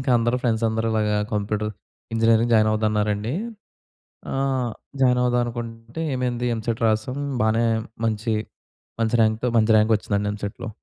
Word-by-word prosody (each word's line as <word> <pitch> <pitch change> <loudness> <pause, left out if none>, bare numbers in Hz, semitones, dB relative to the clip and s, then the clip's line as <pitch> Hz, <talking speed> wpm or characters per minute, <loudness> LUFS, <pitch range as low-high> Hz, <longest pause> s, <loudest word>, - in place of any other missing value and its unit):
ఇంకా 130 0 -1
అందరూ 120 +1 +1
ఫ్రెండ్స్ 115 -2 +1
అందరూ 110 0 -1
ఇలాగా 105 -1 +1 0.2
కంప్యూటర్ 105 +1 -1 0.4
ఇంజినీరింగ్ 115 +1 +3
జాయిన్ 110 -1 +5
అవుదామన్నారండి. 105 0 0 1.0
ఆహ్, 135 -3 0 0.3
జాయిన్ 125 -1 +4
అవుదాం 125 0 +2
అనుకుంటే 115 +3 -6
ఏమైంది 125 -1 -1
ఎంసెట్ 115 0 -3
రాసాం 110 +5 0 0.2
బానే 110 +2 +2 0.4
మంచి, 110 0 -1 0.7
మంచి 115 +1 +2
ర్యాంక్‌తో 110 +3 +1
మంచి 110 0 +4
ర్యాంకొచ్చిందండి 105 -1 +1
ఎంసెట్‌లో. 105 +2 -6
115 Hz, 125 wpm, -23 LUFS, 110-120 Hz, 1.0 s, జాయిన్